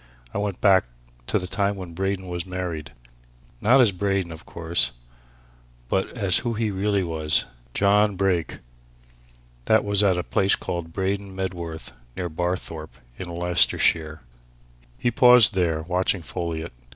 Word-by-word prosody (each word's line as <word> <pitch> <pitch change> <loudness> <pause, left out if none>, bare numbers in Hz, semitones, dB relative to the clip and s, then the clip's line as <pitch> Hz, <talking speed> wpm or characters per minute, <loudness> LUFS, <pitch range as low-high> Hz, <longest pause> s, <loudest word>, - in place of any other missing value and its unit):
I - - -2
went 100 -3 -3
back 95 -5 +5 0.4
to - - +1
the 90 - -4
time 100 +2 -1
when 90 -3 -8
Braden 95 +1 -2
was 90 -1 -3
married. 90 -4 -5 0.7
Not 125 +5 +5
as 120 -5 +6
Braden, 95 -2 -1
of 80 +1 -11
course 85 -6 0 1.0
but 95 - 0
as 100 -5 +2
who 120 -2 -3
he 110 -1 -1
really 100 0 0
was 80 -3 0 0.3
John 105 +1 +3
Brake. 90 -3 0 1.1
That 110 -1 +3
was 100 0 +4
at 95 -3 +3
a 90 - -1
place 95 +3 +3
called 85 -1 -5
Braden 95 +1 -3
Medworth, 85 -4 -5 0.3
near 90 -2 -3
Barthorpe, 85 -1 -4 0.2
in 90 - -6
Leicestershire." 85 -2 +2 0.8
He 120 - 0
paused 125 -1 +6
there, 85 -4 0
watching 90 +1 -1
Folliot. 85 -3 -5
95 Hz, 140 wpm, -24 LUFS, 85-100 Hz, 1.1 s, as